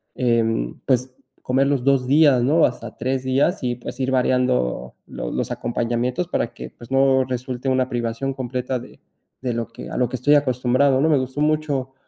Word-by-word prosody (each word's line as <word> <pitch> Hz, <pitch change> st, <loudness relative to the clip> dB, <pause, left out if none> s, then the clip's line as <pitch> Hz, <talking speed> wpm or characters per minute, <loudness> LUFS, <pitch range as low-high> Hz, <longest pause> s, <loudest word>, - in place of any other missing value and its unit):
em, 115 Hz, -, 0 dB
pues, 130 Hz, 0 st, +1 dB, 0.3 s
comer 135 Hz, +2 st, +1 dB
los 140 Hz, -3 st, 0 dB
2, 135 Hz, -1 st, +3 dB
días, 140 Hz, -3 st, +5 dB
no 155 Hz, +5 st, +4 dB
hasta 120 Hz, -3 st, -4 dB
3, 130 Hz, +2 st, -1 dB
días, 135 Hz, +7 st, +1 dB
y 120 Hz, -1 st, 0 dB
pues, 125 Hz, +1 st, -9 dB
ir 130 Hz, 0 st, 0 dB
variando 125 Hz, -, +1 dB
los -, -, -5 dB
los -, -, -2 dB
acompañamientos 120 Hz, +7 st, -1 dB
para 170 Hz, -, -1 dB
que, -, -, -8 dB
pues, 120 Hz, -, -14 dB
no 135 Hz, 0 st, +4 dB
resulte 125 Hz, +1 st, -3 dB
una 130 Hz, -1 st, +1 dB
privación 120 Hz, +3 st, -2 dB
completa 130 Hz, 0 st, -3 dB
de 120 Hz, -, -14 dB, 0.4 s
de 125 Hz, -2 st, -2 dB
lo 115 Hz, 0 st, -3 dB
que 115 Hz, -, -10 dB
a -, -, -6 dB
lo 125 Hz, -1 st, +1 dB
que 130 Hz, -, -3 dB
estoy 145 Hz, +4 st, +4 dB
acostumbrado, 130 Hz, 0 st, +2 dB
¿no? 155 Hz, -, +3 dB
Me 150 Hz, -, +4 dB
gustó 130 Hz, +2 st, -3 dB
mucho, 150 Hz, -4 st, 0 dB
130 Hz, 190 wpm, -22 LUFS, 120-135 Hz, 0.4 s, días